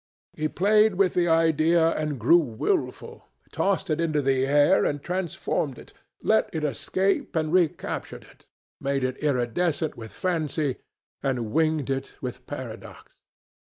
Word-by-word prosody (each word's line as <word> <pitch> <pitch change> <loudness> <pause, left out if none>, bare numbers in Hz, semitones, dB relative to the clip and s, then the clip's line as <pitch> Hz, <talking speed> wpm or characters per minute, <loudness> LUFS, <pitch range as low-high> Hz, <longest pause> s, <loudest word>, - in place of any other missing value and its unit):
He 155 - -1
played 210 +4 +3
with 190 -1 +2
the 175 -1 +2
idea 165 0 +3
and 150 -4 -2
grew 145 +10 +6
wilful; 120 -9 -3 0.2
tossed 195 -1 0
it 155 +2 0
into 155 -3 +1
the 135 -1 +1
air 145 +6 +4
and 145 - 0
transformed 175 -6 -2
it; - - -14 0.3
let 220 0 +3
it 160 -2 -3
escape 185 +7 -1
and 155 0 0
recaptured 175 -4 -1
it; - - -21 0.3
made 140 -1 -1
it 130 0 -2
iridescent 150 +4 0
with 115 -2 -9
fancy 155 -6 -1 0.4
and 125 -5 -2
winged 155 -4 +1
it 135 0 -4
with 125 -2 -7
paradox. - - -8
155 Hz, 140 wpm, -25 LUFS, 135-175 Hz, 0.4 s, grew